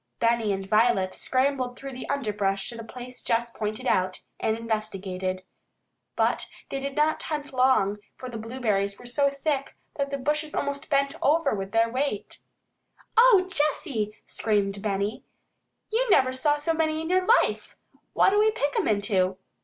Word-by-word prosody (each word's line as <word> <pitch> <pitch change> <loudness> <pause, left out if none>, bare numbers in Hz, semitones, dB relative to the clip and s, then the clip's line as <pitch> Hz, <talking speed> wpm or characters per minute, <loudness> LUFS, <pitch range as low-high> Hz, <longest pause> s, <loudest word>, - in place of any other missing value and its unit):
Benny 230 -2 +2
and 195 0 -3
Violet 210 -3 +3
scrambled 255 -1 0
through 275 -1 -7
the 255 - -7
underbrush 210 -8 -1
to 240 - -7
the 230 - -7
place 250 +2 -8
Jess 235 +1 0
pointed 215 -1 -4
out, 185 0 +1 0.2
and 220 0 0
investigated. 195 -5 -3 0.7
But - - +1 0.2
they 275 - -3
did 275 0 -4
not 305 +1 +2
hunt 295 -3 -4
long, 250 -6 +3 0.2
for 255 - -7
the 235 -3 -6
blueberries 215 -4 -1
were 245 - -13
so 280 +4 +2
thick 275 0 -2 0.2
that 280 -1 -1
the 280 - -2
bushes 300 +3 -1
almost 280 +1 -3
bent 275 -1 +2
over 305 0 +3
with 195 -1 -4
their 225 0 +3
weight. 255 -2 -3 0.8
"O 455 -6 +6
Jessy," 290 - -1
screamed 200 -2 0
Benny, 200 +1 -2 0.7
"you 480 +2 +1
never 260 -9 +4
saw 290 +3 +2
so 325 +3 0
many 315 -1 0
in 320 +1 -4
your 370 0 +2 0.2
life! - - -4 0.4
What'll 410 +2 +4
we 430 +1 +5
pick 290 -9 -1
'em - - +1
into?" 200 -3 +1
250 Hz, 160 wpm, -26 LUFS, 210-285 Hz, 0.8 s, O